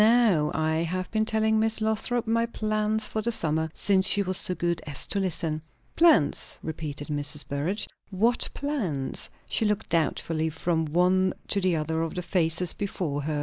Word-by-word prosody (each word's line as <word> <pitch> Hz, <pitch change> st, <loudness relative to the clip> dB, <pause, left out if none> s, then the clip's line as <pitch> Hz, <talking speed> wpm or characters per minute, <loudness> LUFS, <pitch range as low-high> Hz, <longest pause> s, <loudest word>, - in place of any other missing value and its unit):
Now, 215 Hz, -10 st, +4 dB
I 160 Hz, 0 st, +1 dB
have 180 Hz, +3 st, -2 dB
been 220 Hz, 0 st, +1 dB
telling 220 Hz, 0 st, +1 dB
Miss 220 Hz, 0 st, +1 dB
Lothrop 220 Hz, +2 st, 0 dB
my 230 Hz, +1 st, +1 dB
plans 215 Hz, -1 st, -1 dB
for 220 Hz, -, -3 dB
the 235 Hz, +2 st, 0 dB
summer, 160 Hz, -5 st, +1 dB
since 190 Hz, -2 st, +2 dB
she 205 Hz, 0 st, +4 dB
was 185 Hz, 0 st, -2 dB
so 180 Hz, -, -2 dB
good 170 Hz, -1 st, -1 dB
as 145 Hz, -, -1 dB
to 200 Hz, -, -1 dB
listen." 165 Hz, -4 st, -1 dB, 0.3 s
"Plans?" 325 Hz, -, +3 dB
repeated 150 Hz, -2 st, -5 dB
Mrs. 145 Hz, 0 st, +1 dB
Burrage. 155 Hz, +9 st, -2 dB, 0.2 s
"What 225 Hz, +5 st, +1 dB
plans?" 200 Hz, -, -1 dB, 0.2 s
She -, -, +1 dB
looked 210 Hz, 0 st, 0 dB
doubtfully 160 Hz, 0 st, 0 dB
from 160 Hz, 0 st, -1 dB
one 180 Hz, +4 st, +2 dB
to 200 Hz, -, +2 dB
the 185 Hz, -2 st, +2 dB
other 160 Hz, +1 st, -1 dB
of 165 Hz, -1 st, -3 dB
the 180 Hz, -, -3 dB
faces 170 Hz, -1 st, +1 dB
before 170 Hz, -8 st, -3 dB
her. 150 Hz, +1 st, -2 dB
180 Hz, 175 wpm, -26 LUFS, 160-215 Hz, 0.3 s, Now